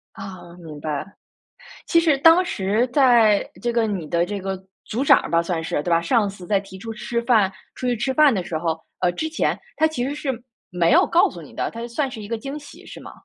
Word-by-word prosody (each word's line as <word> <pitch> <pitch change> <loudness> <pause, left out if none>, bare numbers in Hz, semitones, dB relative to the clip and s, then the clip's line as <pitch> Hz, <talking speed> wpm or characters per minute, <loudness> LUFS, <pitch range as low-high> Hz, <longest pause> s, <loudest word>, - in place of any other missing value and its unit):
啊， 185 -4 -10
明 155 -4 -10
白。 150 -2 -3 0.8
其 335 - +4
实 315 -4 +3
当 330 +5 +6
时 215 - 0
在， 240 -7 +4
这 240 0 0
个 230 -1 +1
你 190 -7 -3
的 170 +2 +1
这 200 +2 -4
个 190 0 -3 0.3
组 245 +5 -2
长 - - +6
儿 - - -7
吧， 170 0 +2
算 170 -2 -2
是， 145 - -1
对 175 - -2
吧， 165 0 +4
上 210 +4 +2
次 190 -3 -9
在 200 -2 +2
提 195 -1 -11
出 225 +3 -7
吃 235 +2 -3
饭 220 -6 +3 0.2
出 255 - -4
去 245 - +1
吃 240 +4 -1
饭 295 -2 +5
的 185 -4 -1
时 160 - -3
候， 160 -1 -2 0.2
呃 175 - +2
之 315 - -3
前， 325 - 0 0.2
他 315 0 +4
其 300 -6 -3
实 280 +3 -2
是 280 -2 -2 0.4
没 170 -1 +2
有 - - +6
告 340 - +3
诉 175 - -10
你 150 - -13
的， - - -2
它 230 - -9
是 235 - -5
算 270 +3 -2
是 220 -4 -8
一 205 - -8
个 230 - -2
惊 275 +6 -6
喜 290 -1 -13
是 - - -10
吗？ - - -10
215 Hz, 265 characters per minute, -22 LUFS, 180-260 Hz, 0.8 s, 当